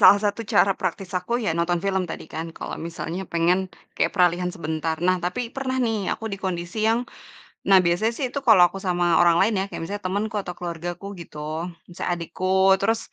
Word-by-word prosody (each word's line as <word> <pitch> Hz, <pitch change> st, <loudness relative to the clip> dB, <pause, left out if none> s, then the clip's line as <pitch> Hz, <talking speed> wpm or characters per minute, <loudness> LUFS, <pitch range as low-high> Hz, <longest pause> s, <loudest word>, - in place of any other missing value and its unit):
salah 205 Hz, -, +9 dB
satu 205 Hz, +2 st, 0 dB
cara 195 Hz, -, +5 dB
praktis 195 Hz, -3 st, -3 dB
aku, 210 Hz, +6 st, -7 dB
ya -, -, +1 dB
nonton 170 Hz, +1 st, +1 dB
film 190 Hz, -1 st, +1 dB
tadi -, -, -6 dB
kan, 160 Hz, +1 st, -3 dB
kalau -, -, -5 dB
misalnya 170 Hz, +1 st, -5 dB
pengen 170 Hz, +2 st, +3 dB, 0.4 s
kayak -, -, +3 dB
peralihan 180 Hz, -1 st, +3 dB
sebentar. 160 Hz, 0 st, -2 dB
Nah, 185 Hz, 0 st, +4 dB
tapi 180 Hz, +7 st, -1 dB
pernah 260 Hz, 0 st, -3 dB
nih, 225 Hz, -2 st, 0 dB, 0.2 s
aku -, -, -10 dB
di 195 Hz, -, -3 dB
kondisi 175 Hz, +1 st, -4 dB
yang 225 Hz, +1 st, +3 dB, 0.7 s
nah 195 Hz, -, +8 dB
biasanya 175 Hz, +6 st, +2 dB
sih 275 Hz, -, -1 dB
itu 280 Hz, -, -1 dB
kalau 215 Hz, -5 st, +8 dB
aku 190 Hz, -, -8 dB
sama 175 Hz, -1 st, +1 dB, 0.2 s
orang 170 Hz, -1 st, +5 dB
lain 210 Hz, +3 st, +3 dB
ya, -, -, +1 dB
kayak -, -, -5 dB
misalnya 205 Hz, +4 st, -5 dB
temenku 210 Hz, +4 st, -2 dB
atau 180 Hz, -, -5 dB
keluargaku 175 Hz, +1 st, -5 dB, 0.2 s
gitu, 160 Hz, -, -11 dB, 0.5 s
misalnya 175 Hz, -, -4 dB
adikku, 170 Hz, +2 st, -4 dB, 0.3 s
terus, 225 Hz, +3 st, +2 dB
180 Hz, 195 wpm, -24 LUFS, 170-205 Hz, 0.7 s, salah